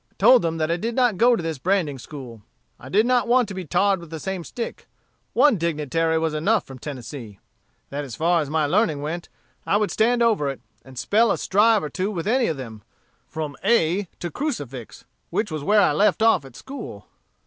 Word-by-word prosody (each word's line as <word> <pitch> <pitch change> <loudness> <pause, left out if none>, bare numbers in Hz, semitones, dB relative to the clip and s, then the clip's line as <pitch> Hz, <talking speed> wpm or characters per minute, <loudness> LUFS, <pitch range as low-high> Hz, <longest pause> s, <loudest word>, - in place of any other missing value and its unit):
"I - - -36
told 250 -2 +6
them 165 -1 -1
that 155 0 0
I 170 - +1
did 225 +5 -3
not 245 -6 +2
go 240 +1 +5
to 175 - -4
this 160 -4 -3
branding 170 -5 0
school; 125 -5 -10 0.4
I 130 - -11
did 210 +9 +3
not 250 -1 +2
want 245 -1 +3
to - - -5
be 185 -1 -6
tarred 190 +4 +2
with 170 -2 -11
the 160 0 -6
same 190 +1 -4
stick; 235 +7 -6 0.5
one 255 -4 +4
dignitary 160 0 0
was 160 -1 0
enough 195 +8 +1
from 135 -1 -11
Tennessee; 120 -6 -8 0.5
that 145 +1 -3
as 130 -5 -7
far 170 +1 +2
as 145 - -4
my 155 0 +1
learning 150 -2 +1
went, 170 +3 -5 0.3
I 200 - +2
would 210 -1 0
stand 235 +2 +2
over 210 -12 +2
it, 135 - -5 0.2
and 130 -1 -14
spell 220 - +3
a - - 0
strive 210 +1 +3
or 150 - -3
two 190 +1 -2
with 175 -6 -4
any 245 +3 +2
of 155 - -2
them, 115 -5 -8 0.5
from 155 -3 -5
a - - -3 0.3
b - - 0
ab - - -39
to 175 - -4
crucifix, 145 - -5 0.2
which 210 -5 -1
was 155 -2 -4
where 210 +6 +4
I - - +4
left 210 +2 +2
off 195 -10 +4
at 135 - -14
school." 220 - -9
170 Hz, 225 wpm, -23 LUFS, 145-215 Hz, 0.5 s, told